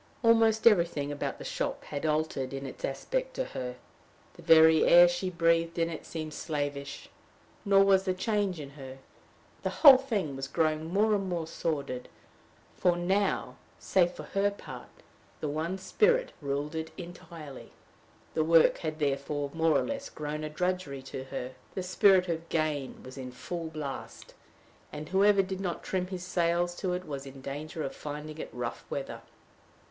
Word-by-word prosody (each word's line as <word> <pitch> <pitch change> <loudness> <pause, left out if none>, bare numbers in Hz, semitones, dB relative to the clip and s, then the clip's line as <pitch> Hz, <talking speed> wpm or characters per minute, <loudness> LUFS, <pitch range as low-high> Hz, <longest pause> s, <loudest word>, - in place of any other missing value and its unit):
Almost 225 -1 +4
everything 170 -9 +4
about 145 - -3
the - - -9
shop - - -3
had 145 +1 -4
altered 150 -4 -1
in 135 0 -5
its 135 - -9
aspect - - -2
to - - -1
her. 125 -1 -5 0.6
The - - -14
very 160 -1 +7
air 175 +1 +8
she 175 +2 -1
breathed 165 -1 +2
in 165 0 +1
it 160 - -7
seemed 155 -2 -5
slavish. 145 -3 -4 0.6
Nor 195 -1 +6
was 195 -1 +4
the 185 -1 0
change 200 -3 0
in 140 -2 -8
her. 135 -2 -10 0.6
The - - -1 0.2
whole 270 -3 +12
thing 210 - -2
was 135 0 -4
growing 155 +1 0
more 215 +3 +3
and 195 -2 0
more 170 -2 -2
sordid, 140 -6 -3 0.7
for 175 -1 +2
now 190 +3 0 0.2
save 180 -2 +2
for - - -8
her 200 +1 +1
part 200 - -10 0.5
the 155 - -3
one 160 +5 -2
spirit 435 - +2
ruled 145 +2 -2
it 160 0 -3
entirely. 170 -5 -10 0.6
The 155 - +2
work 165 0 +5
had 155 -1 -3
therefore 145 0 -1
more 165 -1 +3
or - - +1
less 280 0 -4
grown 150 0 -5
a 155 - -3
drudgery 180 -4 -2
to 130 0 -7
her. 130 -1 -5 0.2
The 185 - -2
spirit 185 0 +4
of 165 -1 -3
gain 150 -4 -2
was 130 +1 -10
in 125 -1 -6
full 165 +6 -5
blast, 155 -4 -7 0.6
and 150 +1 -7
whoever 195 +1 +4
did 190 0 -5
not 180 -3 -3
trim 185 -1 -1
his 185 -1 -6
sails 175 0 +1
to 185 -2 -1
it 180 +1 -3
was 140 -3 -6
in 135 0 -11
danger 150 +4 -5
of 135 - -4
finding 150 +1 -7
it - - -5
rough 120 -1 -5
weather. - - -5
165 Hz, 170 wpm, -29 LUFS, 145-185 Hz, 0.7 s, whole